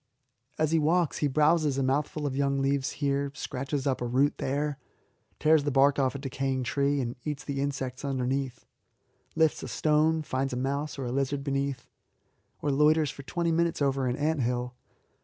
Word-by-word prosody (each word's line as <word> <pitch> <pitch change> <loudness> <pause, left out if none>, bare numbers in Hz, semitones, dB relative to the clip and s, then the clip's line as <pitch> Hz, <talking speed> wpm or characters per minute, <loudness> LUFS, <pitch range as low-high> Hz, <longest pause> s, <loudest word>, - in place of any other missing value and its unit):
As 155 0 +1
he 165 - +3
walks 165 +1 +1
he 150 - +2
browses 150 0 +3
a 135 - +1
mouthful 145 +3 0
of 135 -2 -2
young 140 0 +1
leaves 135 0 0
here, 140 0 0
scratches 135 +1 -3
up 135 -3 0
a 120 - -1
root 135 +4 +1
there, 145 +1 -1 0.6
tears 155 -1 +4
the 145 - 0
bark 140 +1 +4
off 135 0 +1
a - - -2
decaying 135 -1 -2
tree 140 +3 +1
and 120 -1 -2
eats 150 -2 -4
the 140 -1 -3
insects 135 -2 -3
underneath, 135 -1 -2 0.7
lifts 160 -1 +2
a - - -5
stone 155 +1 +2
and 155 -1 -4
finds 130 0 -1
a - - -2
mouse 140 +4 -2
or 135 - -4
a 120 - -3
lizard 135 +1 -1
beneath, 140 -1 -2 0.8
or 145 - +1
loiters 150 +1 +3
for - - -10
twenty 170 +4 -1
minutes 170 0 +1
over 135 -2 +1
an 125 - 0
ant 150 +1 0
hill. 125 +1 -1
140 Hz, 190 wpm, -28 LUFS, 135-150 Hz, 0.8 s, tears